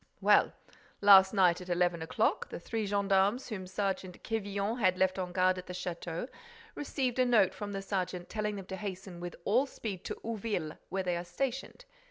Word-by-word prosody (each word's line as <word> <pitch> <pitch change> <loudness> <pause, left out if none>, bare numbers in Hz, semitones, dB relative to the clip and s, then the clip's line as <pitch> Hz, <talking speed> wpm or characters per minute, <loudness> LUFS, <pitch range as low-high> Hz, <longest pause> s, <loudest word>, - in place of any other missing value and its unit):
"Well, - - +4 0.5
last 195 -2 +8
night, 185 -4 +3
at 180 - -9
eleven 175 -1 +1
o'clock, 160 - 0
the - - -6
three 220 +4 -3
gendarmes 200 +4 +2
whom 190 -5 -5
Sergeant 190 -1 -3
Quevillon 205 +1 -2
had 185 -4 +3
left 190 0 +2
on 180 -1 -3
guard 185 0 +2
at 180 - -10
the 180 - -6
château 175 +2 -4 0.5
received 265 -3 -2
a - - +6
note 215 -6 +4
from 205 -1 -6
the 195 -1 -4
sergeant 185 -2 -3
telling 210 -1 -2
them 195 -2 -7
to 190 0 -6
hasten 190 -3 -6
with 175 0 -6
all 250 +7 +3
speed 205 -8 -6
to - - -3
Ouville, 210 -8 -3
where 190 0 -1
they 180 -1 0
are 175 - -4
stationed. 265 - -4
195 Hz, 190 wpm, -31 LUFS, 180-210 Hz, 0.5 s, last